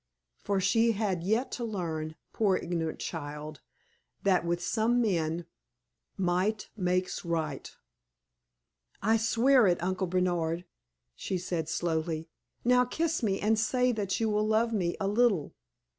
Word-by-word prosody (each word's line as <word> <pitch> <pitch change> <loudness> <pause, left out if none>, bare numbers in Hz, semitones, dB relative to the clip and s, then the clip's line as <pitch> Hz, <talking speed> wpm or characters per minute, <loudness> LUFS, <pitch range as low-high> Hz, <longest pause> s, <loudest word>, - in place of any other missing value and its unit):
For 200 -1 0
she 225 +4 +3
had 195 -5 -1
yet 220 +8 0
to 245 - -4
learn, 160 -8 -3 0.2
poor 200 -4 +2
ignorant 165 -2 -2
child, 150 -2 -6 0.6
that 190 -3 +3
with 170 0 0
some 225 +6 +1
men 170 -6 0 0.7
"might 190 +3 0
makes 185 -2 -1
right." 160 -5 -3 1.3
"I 220 +2 +4
swear 235 +2 +4
it, 175 -1 +3
Uncle 185 +1 -1
Bernard!" 175 -1 0 0.5
she 185 - -3
said, 170 -3 -3
slowly. 165 -1 -1 0.4
"Now, 250 +1 +5
kiss 325 +6 -1
me, 200 -4 0
and 215 +1 +2
say 250 +2 +2
that 205 -4 -1
you 225 - +1
will 210 0 +1
love 225 +2 +2
me 175 -5 0
a 195 - 0
little!" 205 -7 +2
190 Hz, 135 wpm, -29 LUFS, 170-220 Hz, 1.3 s, Now